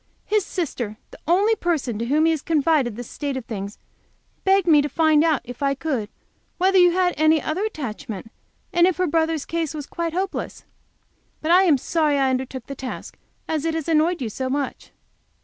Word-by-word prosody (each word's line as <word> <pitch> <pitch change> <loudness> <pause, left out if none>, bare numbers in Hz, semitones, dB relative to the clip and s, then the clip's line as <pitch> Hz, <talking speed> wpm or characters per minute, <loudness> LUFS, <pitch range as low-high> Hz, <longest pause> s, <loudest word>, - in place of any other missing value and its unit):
"His 425 -1 +1
sister, 250 - -4
the - - -13
only 395 +6 +4
person 300 - -1
to 230 - -1
whom 300 +4 +3
he 325 0 +3
confided 295 -6 +1
the 245 - -6
state 280 +3 -4
of 255 - -6
things, 200 -2 -6 0.7
begged 385 -1 +3
me 310 -4 +6
to 290 - -2
find 315 -1 +3
out, 315 -5 +2
if 245 +2 -10
I 275 -1 +1
could, 265 -8 -2 0.5
whether 380 +1 +4
you 355 0 +7
had 360 0 +2
any 310 +1 +4
other 315 +7 -2
attachment, 225 - -6 0.4
and 345 0 +5
if 370 - 0
her 365 - +2
brother's 320 -2 0
case 330 -2 -2
was 295 -2 -5
quite 335 +1 -4
hopeless. 380 +2 -3 0.7
But 315 - -1
I 370 +2 +6
am 310 -6 +5
sorry 300 +1 +1
I 270 -1 +2
undertook 260 -1 -3
the 275 - -6
task 260 -1 -7 0.3
as 310 -2 -1
it 325 0 -1
has 320 -1 -3
annoyed 325 -1 +2
you 225 - -2
so 260 +4 -3
much." 280 +1 -3
310 Hz, 195 wpm, -23 LUFS, 265-340 Hz, 0.7 s, you